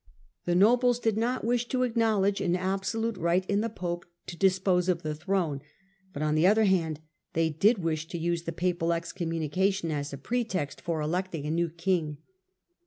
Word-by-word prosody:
The 175 - +1
nobles 240 +5 +4
did 225 -3 0
not 240 +4 0
wish 240 0 +1
to 255 0 0
acknowledge 220 -5 +1
an 180 -2 +1
absolute 195 +4 -1
right 175 +3 +1
in 200 +1 +1
the 230 - -1
pope 175 -4 -4 0.2
to 175 - -7
dispose 185 -1 +2
of 175 -1 0
the 155 0 -2
throne; 160 -3 -1 0.5
but, 150 -2 -4
on 150 0 +1
the 155 +4 +4
other 220 +3 +5
hand, 165 -6 +1 0.3
they 165 0 +1
did 205 +10 +3
wish 160 -1 -1
to 170 - -5
use 170 0 -1
the 165 - -2
papal 170 0 0
excommunication 170 +2 -1
as 145 -1 -3
a 140 - -6
pretext 195 - -2
for 165 -2 -2
electing 170 0 -2
a 150 - -1
new 170 +1 +1
king. 165 -2 -1
180 Hz, 180 wpm, -28 LUFS, 165-205 Hz, 0.5 s, other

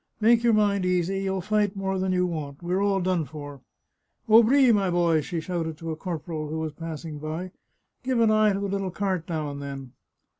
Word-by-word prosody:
" - - -47
Make 230 +1 +4
your 235 -1 +4
mind 200 -2 +2
easy; 180 +1 0
you'll 190 -1 -1
fight 210 +1 0
more 195 -1 -2
than 190 0 0
you 180 0 +2
want. 155 -3 -5
We're 180 +3 0
all 200 -1 +1
done 180 -2 +1
for! 145 -1 -9 0.2
" - - -53
" - - -47
Aubry, 235 +4 +6
my 200 -3 +2
boy," 170 -2 +2
she 165 +3 -4
shouted 160 -2 -3
to 165 0 -5
a - - -3
corporal 160 -2 -5
who 160 - -3
was 160 -1 -3
passing 160 -1 -7
by, 160 +5 -5 0.3
" - - -51
give 255 -2 0
an 225 -1 +4
eye 215 -1 +4
to 195 - -2
the - - -1
little 195 -1 -2
cart 185 -2 -2
now 155 -3 -2
and 140 0 -7
then." 135 -2 -7
180 Hz, 230 wpm, -26 LUFS, 160-200 Hz, 0.3 s, Aubry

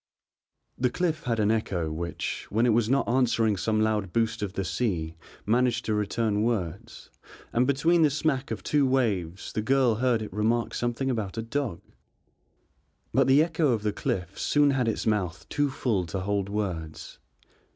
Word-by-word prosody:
The 125 0 +2
cliff 160 0 -2
had 115 -2 0
an 105 0 +3
echo 90 -8 -1
which, 85 +2 -4
when 115 +3 +2
it 120 - +4
was 115 0 +2
not 135 +2 +2
answering 115 -3 +2
some 110 +3 0
loud 105 -4 0
boost 115 +1 0
of 100 -2 -3
the 95 - -2
sea 85 -8 -2 0.3
managed 120 +3 +1
to 110 - 0
return 105 0 0
words, 100 -6 -3 0.4
and 125 +2 +2
between 165 +5 +3
the 155 - +5
smack 140 -2 -1
of - - -5
two 145 -2 +2
waves 100 -9 -1
the 110 - -1
girl 130 0 +3
heard 120 0 +1
it 105 - -8
remark 115 +3 0
something 120 +3 -1
about 110 -4 -3
a 115 - -2
dog. 115 -5 -3 1.3
But 135 +2 +3
the 135 +3 +6
echo 160 -5 +1
of 110 -2 -2
the 105 -1 0
cliff 90 -3 -3
soon 145 -1 +3
had 130 -3 0
its 115 - -1
mouth 95 -5 -1
too 145 -1 +1
full 115 -10 -1
to 95 +4 -3
hold 100 0 -1
words. 90 -7 -4
115 Hz, 175 wpm, -27 LUFS, 100-130 Hz, 1.3 s, the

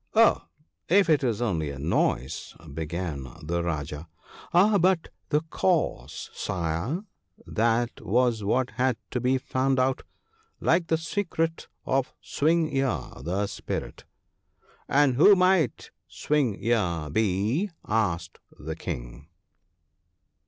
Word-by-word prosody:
' - - -45
Oh, 230 +1 +5 0.4
if 190 -2 +5
it 150 -2 +3
was 120 -2 0
only 80 -9 -1
a 70 - -6
noise,' 70 -3 -1 0.2
began 80 -4 -4
the 85 +3 -1
Rajah. 75 -2 -4 0.3
' - - -18
Ah, 200 +4 +5
but 180 -1 +2 0.2
the 150 0 +2
cause, 180 -4 -1
Sire! 90 - -2 0.4
that 115 +1 0
was 120 -1 +2
what 125 +5 +1
had 125 -2 +1
to 125 - -1
be 130 +2 +2
found 130 +1 0
out; 130 0 +1 0.6
like 170 0 +2
the 160 - +2
secret 165 -1 -2 0.2
of 135 0 0
Swing 160 0 +1
ear 130 - 0
the 95 +4 -1
Spirit.' - - -5 0.5
' - - -33
And 135 -4 +4
who 200 +8 +8
might 185 -8 +2 0.2
Swing 140 -9 0
ear 90 -9 0
be? 110 - +1
' - - -46
asked 90 -6 -1 0.2
the - - -5
King. - - -6
120 Hz, 130 wpm, -26 LUFS, -, 0.6 s, who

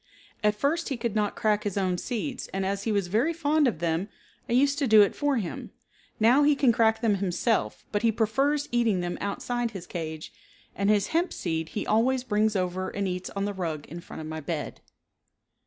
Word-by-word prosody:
At 210 0 +3
first 305 +9 0
he 270 - -2
could 235 -2 -2
not 210 -1 0
crack 210 -1 +1
his 205 -1 -3
own 185 -2 +1
seeds 255 - -4
and 195 0 -3
as 200 +1 -2
he 225 - +1
was 200 -3 +1
very 225 - +1
fond 310 -2 +2
of 230 - 0
them 170 +4 -1 0.4
I - - 0
used 280 +4 +3
to 280 - +1
do 215 -2 +8
it 200 - -1
for 290 -2 +1
him. 195 -7 -4 0.5
Now 240 +6 +5
he 295 0 +4
can 275 -3 +4
crack 225 -1 +2
them 215 -4 +2
himself, 195 +5 0
but 205 - 0
he 230 -1 +3
prefers 270 +7 +1
eating 230 -6 +2
them 175 0 -3
outside 240 +4 -2
his 190 -5 -8
cage, 160 -3 -6 0.4
and 200 +1 0
his 205 -2 +2
hemp 340 +3 +1
seed 160 -2 -3
he - - -1
always 245 +4 +2
brings 215 -2 +1
over 185 0 -1
and 200 -1 -2
eats 180 0 -3
on 200 0 -1
the 205 - -2
rug 165 -6 -4
in 170 - -7
front 170 - -9
of - - -7
my 160 0 -5
bed. 155 0 -5
210 Hz, 215 wpm, -27 LUFS, 185-245 Hz, 0.5 s, do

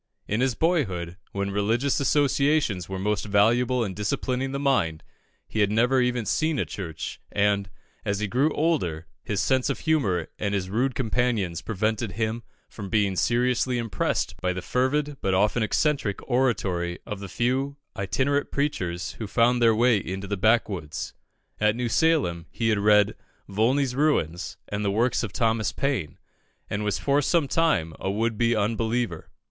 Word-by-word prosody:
In 105 +4 0
his 130 -2 +1
boyhood, 95 - 0
when 100 0 -2
religious 115 +7 +1
associations 140 - +2
are 95 - -3
most 105 +2 -1
valuable 120 +5 +3
in 95 - -4
disciplining 125 +6 -2
the 140 - -2
mind, 105 - +1 0.4
he 110 - -4
had 105 -1 +4
never 120 +5 +3
even 125 -2 0
seen 155 +4 +1
a - - 0
church, 80 -6 -6
and, 100 -1 +1 0.3
as 100 -2 -1
he 105 - -1
grew 130 +9 +2
older, 95 - 0 0.2
his 105 -2 -1
sense 130 -1 +1
of - - -2
humour 110 - +1
and 100 -1 -1
his 95 -1 -3
rude 125 +4 0
companions 115 -8 0
prevented 110 -1 -1
him 110 +3 -2 0.3
from 100 -3 -8
being 100 -3 +1
seriously 125 +3 +1
impressed 115 -7 -1
by 90 0 0
the 90 - -4
fervid 140 +6 0
but 95 -1 +1
often 105 +5 +2
eccentric 115 -2 +1
oratory 95 -9 0
of 105 - -5
the 100 -1 -7
few 130 +7 -1 0.2
itinerant 130 +9 0
preachers 90 -12 -2
who 110 - -4
found 120 +4 +3
their 115 -2 +5
way 120 0 +4
into 95 +2 -5
the 100 +1 -2
backwoods. 95 -7 0 0.5
At 105 0 +3
New 120 0 -2
Salem, 115 - +1
he 115 -1 -1
had 105 -2 +2
read 105 0 +4 0.3
"Volney's 125 +6 +1
Ruins" 90 - 0
and 100 +1 -3
the 100 - +1
works 115 +5 +1
of 110 - -4
Thomas 110 -2 +1
Paine, 130 - -2 0.5
and 105 +1 -1
was 105 -2 0
for 140 +1 +2
some 155 0 +2
time 135 - +1
a 95 - -2
would 110 +3 0
be 115 +1 +2
unbeliever. 110 -3 -1
110 Hz, 165 wpm, -25 LUFS, 100-130 Hz, 0.5 s, their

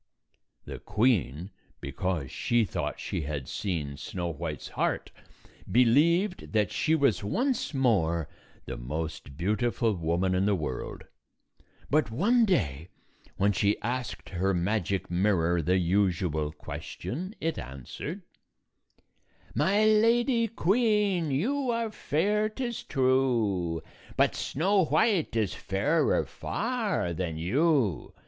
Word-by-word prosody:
The - - -7
queen, 95 - 0 0.3
because 75 +1 -3
she 120 -2 +1
thought 90 - -3
she - - -3
had 70 -3 -4
seen 75 -8 -3
Snow 90 +2 -4
White's 80 -3 -5
heart, - - -1 0.6
believed 160 - +3
that 105 -3 +2
she 160 - +2
was 140 - +2
once 255 - 0
more 85 - +2 0.4
the - - -5
most 70 +1 -5
beautiful 110 +5 +1
woman 85 +1 0
in 95 +2 +2
the 105 - +3
world; 75 -8 -4 0.9
but 150 -4 +3
one 225 - +3
day, 85 - 0 0.5
when 100 +1 +3
she 100 +1 +1
asked 125 0 -3
her 95 +1 0
magic 95 +1 -1
mirror 90 -2 +2
the 90 +4 +2
usual 85 -4 +1
question, 170 - -6
it 165 0 -2
answered, 70 - -7 0.7
" - - -38 0.5
My 195 +8 +3
Lady 230 +2 +4
Queen, 210 -5 +2
you 250 - 0
are 230 -2 -1
fair, 210 +6 0
't 240 +5 -5
is 240 -2 -3
true; 120 - +1 0.3
But - - +4
Snow 190 +6 +1
White 160 - +2
is 110 -5 +1
fairer 145 +11 +1
far 220 - -2
than 85 -2 -3
you. 125 - +1
110 Hz, 120 wpm, -28 LUFS, -, 0.9 s, Lady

